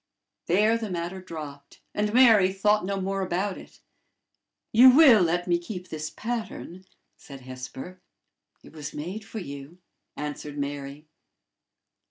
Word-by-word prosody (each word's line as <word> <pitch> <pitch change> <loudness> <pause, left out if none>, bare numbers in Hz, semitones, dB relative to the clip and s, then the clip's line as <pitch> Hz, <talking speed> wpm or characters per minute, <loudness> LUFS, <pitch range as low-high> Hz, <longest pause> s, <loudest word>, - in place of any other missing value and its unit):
There 215 +6 +3
the 220 -2 -4
matter 175 +1 -4
dropped, 150 -5 -9
and 210 0 0
Mary 220 -6 +6
thought 210 +2 +2
no 195 +1 -2
more 195 +1 -2
about 190 +2 -2
it. - - -16 0.9
"You 245 +4 +9
will 260 -6 +7
let 175 +1 0
me 175 -1 +2
keep 180 +1 -8
this 155 0 -5
pattern?" 220 -5 -6 0.3
said 135 -2 -12
Hesper. 130 +8 -9 0.6
"It - - -15
was 150 -2 -8
made 180 +9 -5
for 210 - -9
you," 140 -3 -8 0.4
answered 150 0 -6
Mary. 140 +1 -5
180 Hz, 135 wpm, -26 LUFS, 150-210 Hz, 0.9 s, You